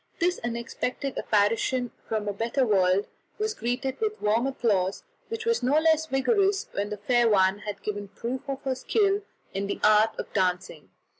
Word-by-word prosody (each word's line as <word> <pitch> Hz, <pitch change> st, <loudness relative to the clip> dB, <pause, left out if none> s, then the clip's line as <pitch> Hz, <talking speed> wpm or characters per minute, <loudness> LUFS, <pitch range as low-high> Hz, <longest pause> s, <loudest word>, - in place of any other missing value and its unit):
This 355 Hz, +1 st, +1 dB
unexpected 240 Hz, +3 st, -3 dB
apparition 230 Hz, +4 st, +1 dB, 0.2 s
from 215 Hz, -1 st, -1 dB
a 205 Hz, -, -1 dB
better 235 Hz, +6 st, 0 dB
world 190 Hz, -2 st, +3 dB, 0.3 s
was 430 Hz, +1 st, -1 dB
greeted 260 Hz, -, -3 dB
with 430 Hz, -1 st, -1 dB
warm 220 Hz, +5 st, +2 dB
applause, 200 Hz, -8 st, 0 dB, 0.2 s
which 455 Hz, 0 st, -5 dB
was 465 Hz, 0 st, +1 dB
no 255 Hz, +3 st, +1 dB
less 320 Hz, 0 st, +3 dB
vigorous 395 Hz, -, +2 dB
when 205 Hz, +1 st, -2 dB
the 210 Hz, -, -4 dB
fair 240 Hz, +3 st, +3 dB
one 190 Hz, -1 st, +3 dB
had 205 Hz, -2 st, -7 dB
given 205 Hz, -1 st, -4 dB
proof 235 Hz, +6 st, -5 dB
of 275 Hz, 0 st, -4 dB
her 265 Hz, -1 st, 0 dB
skill 400 Hz, -, +1 dB, 0.3 s
in 200 Hz, +1 st, -2 dB
the -, -, -3 dB
art 215 Hz, +1 st, +4 dB
of -, -, -6 dB
dancing. 180 Hz, -5 st, -1 dB
235 Hz, 170 wpm, -27 LUFS, 205-275 Hz, 0.3 s, art